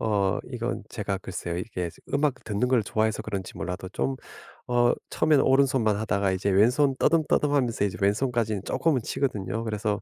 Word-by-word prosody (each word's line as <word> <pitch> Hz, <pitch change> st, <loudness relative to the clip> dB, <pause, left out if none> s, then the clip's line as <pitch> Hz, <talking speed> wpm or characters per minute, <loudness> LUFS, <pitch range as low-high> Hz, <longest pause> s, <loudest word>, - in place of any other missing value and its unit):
어 100 Hz, -3 st, +1 dB
이건 120 Hz, 0 st, -3 dB
제가 100 Hz, -4 st, -3 dB
글쎄요. 90 Hz, -2 st, -5 dB
이게 90 Hz, -3 st, -4 dB, 0.3 s
음악 145 Hz, -1 st, +2 dB
듣는 105 Hz, +4 st, 0 dB
걸 125 Hz, -3 st, +3 dB
좋아해서 110 Hz, 0 st, 0 dB
그런지 100 Hz, -3 st, -5 dB
몰라도 90 Hz, 0 st, -5 dB
좀 135 Hz, +6 st, -1 dB, 0.5 s
어 120 Hz, 0 st, +4 dB, 0.2 s
처음에는 150 Hz, -3 st, +3 dB
오른손만 130 Hz, -6 st, +3 dB
하다가 100 Hz, -2 st, 0 dB
이제 95 Hz, +2 st, 0 dB
왼손 125 Hz, +8 st, +4 dB
더듬 160 Hz, 0 st, +3 dB
더듬 145 Hz, -1 st, +2 dB
하면서 120 Hz, -7 st, +1 dB
이제 95 Hz, -, -4 dB
왼손까지는 110 Hz, -1 st, +1 dB
조금은 150 Hz, -7 st, +1 dB
치거든요. 110 Hz, -5 st, -2 dB
그래서 105 Hz, -1 st, -1 dB
110 Hz, 395 characters per minute, -26 LUFS, 100-130 Hz, 0.5 s, 어